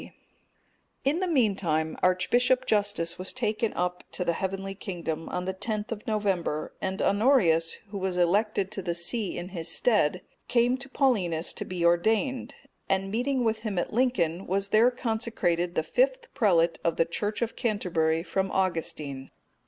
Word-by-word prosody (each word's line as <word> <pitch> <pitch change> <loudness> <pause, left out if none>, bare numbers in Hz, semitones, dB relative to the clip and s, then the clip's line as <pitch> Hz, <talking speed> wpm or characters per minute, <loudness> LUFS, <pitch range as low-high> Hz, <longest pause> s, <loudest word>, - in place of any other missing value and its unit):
D.] - - -11 0.9
In 290 +5 +1
the 370 - 0
meantime, 195 - +1
Archbishop 245 +8 +3
Justus 205 -6 +1
was 185 - -1
taken 225 -2 -1
up 180 0 -2
to 180 - -2
the 170 - +2
heavenly 195 +2 -3
kingdom, 170 -5 -5
on 180 - -3
the 190 - -2
10th 215 +3 -3
of 215 -2 -6
November,(258) 195 -8 -1
and 190 0 -2
Honorius, 195 -8 +3 0.2
who 200 - -4
was 185 -1 -2
elected 195 +2 +1
to 205 - -4
the 175 -2 -2
see 195 +4 0
in 175 - -5
his 170 -4 -5
stead, 185 -3 +2 0.2
came 245 +1 +3
to 275 +1 -7
Paulinus 190 - +1
to - - -5
be 180 -2 -2
ordained, 225 +9 +1 0.3
and 195 0 0
meeting 250 +2 0
him 220 -3 -2
at 175 - -1
Lincoln 195 -8 +1
was 195 +2 -1
there 225 +4 +5
consecrated 220 -8 -1
the 160 - +1
fifth - - 0
prelate 175 -9 +3
of 170 - +1
the 165 - +3
Church 205 +7 -2
of 230 - -4
Canterbury 165 -8 0
from 190 +1 -1
Augustine. 155 -7 -2
195 Hz, 160 wpm, -27 LUFS, 175-230 Hz, 0.9 s, there